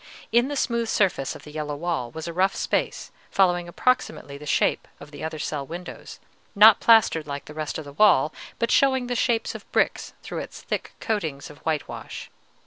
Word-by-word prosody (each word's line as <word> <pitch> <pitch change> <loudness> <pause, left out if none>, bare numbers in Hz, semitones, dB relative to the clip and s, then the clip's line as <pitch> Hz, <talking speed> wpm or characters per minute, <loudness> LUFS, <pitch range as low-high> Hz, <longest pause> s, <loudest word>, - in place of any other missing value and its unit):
In 240 +2 +4
the 290 - -3
smooth 235 -4 0
surface 185 -12 +1
of - - -11
the 150 - -11
yellow 150 -1 -4
wall 160 -6 -2
was 160 +6 -7
a 170 - -4
rough 190 +3 +2
space, - - -2 0.2
following 175 -2 +2
approximately 255 - -1
the 150 +1 -10
shape - - +1
of 150 - -12
the 145 - -9
other 160 0 -4
cell 150 -1 -3
windows, 170 +5 -9 0.4
not 210 +1 +8
plastered 215 -9 +4
like 140 -1 -5
the 150 - -10
rest 155 -1 -4
of 160 - -7
the 140 - -10
wall, 155 -5 +4 0.2
but 235 0 0
showing 265 -2 +3
the 245 0 -2
shapes 235 -1 +1
of - - -11
bricks - - 0
through - - -5
its - - -8
thick - - -4
coatings 160 - -3
of 145 - -15
whitewash. 155 -2 -4
170 Hz, 195 wpm, -25 LUFS, 150-225 Hz, 0.4 s, not